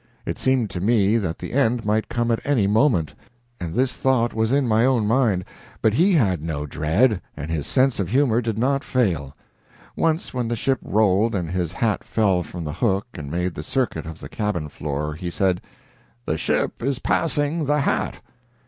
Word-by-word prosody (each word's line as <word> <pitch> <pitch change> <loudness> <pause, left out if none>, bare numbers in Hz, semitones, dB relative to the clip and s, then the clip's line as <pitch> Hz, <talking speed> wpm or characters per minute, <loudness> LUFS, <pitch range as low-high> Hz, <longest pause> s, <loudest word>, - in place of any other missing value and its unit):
It - - -4
seemed 130 -6 +1
to 90 - -4
me 105 0 +3
that 90 -7 -2
the - - -7
end 120 -4 +1
might 110 +1 0
come 120 0 0
at 115 - +1
any 135 -8 +2
moment, 105 - +2 0.5
and 85 -2 -5
this 130 +1 +1
thought 125 -3 +1
was 110 +1 0
in 140 +1 +3
his 110 - +1
own 125 -5 +2
mind, 110 -5 +2 0.3
but 110 - +2
he 180 - +4
had 95 - +2
no 75 -2 -3
dread, 85 - +1 0.2
and 75 +2 -5
his 80 -3 -2
sense 130 -3 +2
of 95 -4 -1
humor 125 -1 +3
did 115 -2 -2
not 135 +4 +1
fail. 85 - 0 0.6
Once 165 +1 0
when 125 -2 -1
the 120 - -1
ship 130 +3 0
rolled 105 +1 +2
and 85 -4 -2
his 90 -3 -1
hat 110 +2 0
fell 100 -5 +1
from 85 +1 -7
the 75 -1 -4
hook 95 +2 0
and 70 -2 -7
made 90 +3 -1
the 75 - -5
circuit 120 - -2
of 80 -1 -8
the - - -8
cabin 105 -8 -2
floor, 75 +1 -3
he 85 +3 -5
said: 90 0 0 0.6
"The - - 0
ship - - -1
is 135 +2 0
passing 150 +2 0
the 150 +1 +2
hat." - - -1
110 Hz, 195 wpm, -23 LUFS, 90-130 Hz, 0.6 s, he